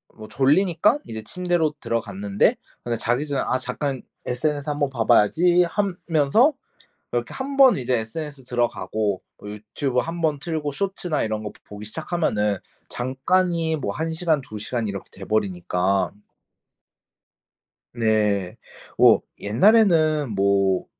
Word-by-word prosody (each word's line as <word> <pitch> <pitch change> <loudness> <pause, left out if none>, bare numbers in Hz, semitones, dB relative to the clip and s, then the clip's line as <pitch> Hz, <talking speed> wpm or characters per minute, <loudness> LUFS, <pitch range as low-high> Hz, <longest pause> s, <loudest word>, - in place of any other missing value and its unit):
뭐 110 -1 -10
졸리니깐 165 - +3
이제 110 -1 -6
침대로 175 +2 -1
들어갔는데 100 -3 0 0.3
근데 120 -1 -2
자기 120 +7 -1
전에 140 -1 -1
'아 130 - +1
잠깐 135 0 -3 0.2
SNS 145 +3 -2
한번 145 -1 0
봐봐야지.' 160 - +3
하면서 185 - +2 0.6
이렇게 - - -2
1 275 +1 -5
번 265 -3 +7
이제 125 -1 0
SNS 140 +4 -6
들어가고 110 -5 -1 0.2
뭐 105 - -9
유튜브 120 +5 -2
1 165 +3 -4
번 150 -3 +1
틀고 155 -2 -3
숏츠나 180 -2 -2
이런 110 -1 -3
거 105 - -5
보기 105 +1 -9
시작하면은 110 - -1 0.3
잠깐이 160 +6 0
뭐 100 -8 -3
1 160 +1 -3
시간 160 -3 +1
2 110 -4 -9
시간 110 +1 -3
이렇게 100 -1 -6
돼버리니까. 95 -2 -1 1.8
네. 105 -5 +1 0.4
오. - - +6 0.2
옛날에는 155 - +3
뭐 100 -1 +2
130 Hz, 265 characters per minute, -23 LUFS, 105-160 Hz, 1.8 s, 번